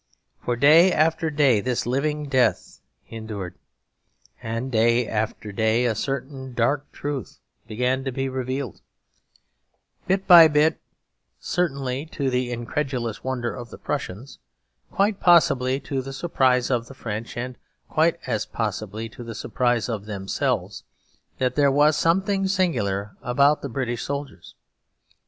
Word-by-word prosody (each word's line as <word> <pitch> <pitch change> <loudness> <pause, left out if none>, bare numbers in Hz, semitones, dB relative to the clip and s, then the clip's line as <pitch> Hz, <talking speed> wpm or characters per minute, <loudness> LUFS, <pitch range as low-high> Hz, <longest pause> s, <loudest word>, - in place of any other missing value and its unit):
For 120 - 0
day 155 +8 +6
after 160 +1 +2
day 140 -8 +3
this 125 +2 -1
living 145 +4 -1
death 130 -4 +1 0.3
endured. 110 -5 -6 0.9
And 115 +4 -4
day 115 +1 +3
after 105 -1 -3
day 110 +4 +1
a 120 - +2
certain 130 +2 -5
dark 135 +5 0
truth 145 -3 -5 0.3
began 125 +4 -1
to 135 - -1
be 135 +2 -2
revealed, 130 -2 -4 1.3
bit 190 +1 +1
by 170 -3 +10
bit, 155 +1 +2 0.6
certainly 140 -4 -2
to 140 -4 -2
the 125 0 -1
incredulous 120 -1 -3
wonder 125 -3 -2
of 120 -2 -8
the - - -10
Prussians, 115 +9 -5 0.5
quite 200 0 +1
possibly 135 -7 +4
to 135 0 -3
the 135 +1 -7
surprise 130 -4 +1
of 120 -2 0
the 135 - -12
French, 115 -1 -6
and 125 +1 -4 0.3
quite - - +2
as - - -2
possibly 110 +2 -4
to 120 - -10
the 115 -1 -7
surprise 120 -1 0
of 110 -4 -4
themselves; 100 -2 -2 0.5
that 125 -1 0
there 140 -1 +3
was 145 +2 +4
something 195 +5 +1
singular 110 - -1
about 140 +4 +3
the 140 - -5
British 120 -1 -3
soldiers. 140 -9 -6
130 Hz, 135 wpm, -24 LUFS, 115-145 Hz, 1.3 s, by